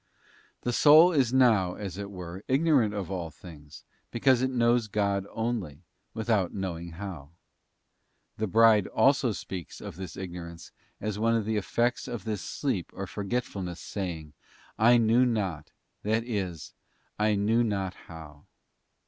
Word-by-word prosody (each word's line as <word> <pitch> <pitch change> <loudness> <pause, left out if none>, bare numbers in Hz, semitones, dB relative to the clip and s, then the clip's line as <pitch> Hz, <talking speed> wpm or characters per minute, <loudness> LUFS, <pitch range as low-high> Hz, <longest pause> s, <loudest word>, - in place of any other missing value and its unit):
The 120 - -2
soul 155 +7 +7
is 135 -7 +2
now, 110 -9 +3
as 100 -2 -6
it 100 -1 -5
were, 90 0 -8
ignorant 135 -5 +3
of 100 -2 -4
all 85 -3 -3
things, 75 -3 -13 0.3
because 125 +1 +3
it 130 - +1
knows 120 -2 +2
God 100 -2 -1
only, 110 - -3 0.3
without 110 -5 0
knowing 85 -3 -4
how. 85 -6 -7 1.1
The 110 - -1
Bride 110 0 +5
also 135 -3 +3
speaks 95 -4 -7
of - - -8
this 95 -3 -7
ignorance 85 -3 -8 0.3
as 105 0 -3
one 115 +1 +2
of 110 -2 0
the 110 +1 -1
effects 120 +4 0
of 120 -6 -5
this 105 -3 -3
sleep - - -3
or - - -4
forgetfulness, 100 -4 -4
saying, 85 -6 -5 0.5
'I 120 +2 +6
knew 115 +2 +4
not:'t 100 -11 -2 0.3
that 110 +2 0
is, 95 - -4 0.5
I 105 0 +3
knew 110 +4 +2
not 100 -4 -2
how. 75 -4 -13
105 Hz, 145 wpm, -28 LUFS, 90-115 Hz, 1.1 s, soul